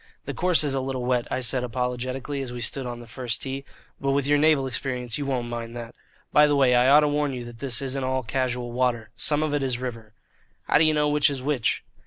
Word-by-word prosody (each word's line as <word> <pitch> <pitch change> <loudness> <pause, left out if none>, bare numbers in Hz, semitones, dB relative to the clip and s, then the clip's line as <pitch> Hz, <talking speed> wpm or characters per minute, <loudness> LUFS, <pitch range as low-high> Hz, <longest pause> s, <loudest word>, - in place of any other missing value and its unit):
"The - - -4
course 180 -3 +3
is 145 -2 0
a 135 - 0
little 130 -1 -3
wet," 125 -1 +1
I - - -1
said 125 +1 0
apologetically, 125 +3 -3
as 130 -2 -5
we 120 - -6
stood 125 +3 -1
on 120 -1 -6
the - - -10
first 115 0 -4
tee, 135 0 -4 0.4
"but 135 0 0
with 140 -1 +1
your 145 +1 +3
naval 150 -3 +4
experience 125 -1 -3
you 140 - -3
won't 125 -3 -1
mind 120 0 -5
that. 120 -1 -7 0.4
By 150 0 +7
the 145 - +2
way, 135 -3 +4
I 125 +1 +4
ought 145 +3 +7
to 150 - +2
warn 145 -1 0
you 125 -2 -5
that 120 -1 -11
this 135 -2 -1
isn't 135 0 -2
all 130 0 -1
casual 125 0 -2
water. 120 -3 0
Some 145 +7 +2
of 155 -1 -1
it 145 - +1
is 130 -3 0
river." 115 -4 -6 0.5
"How - - +3
do 160 - +5
you 155 - +4
know 150 0 +2
which 150 0 +3
is 135 -3 -4
which?" 140 -5 0
130 Hz, 255 wpm, -25 LUFS, 120-140 Hz, 0.5 s, By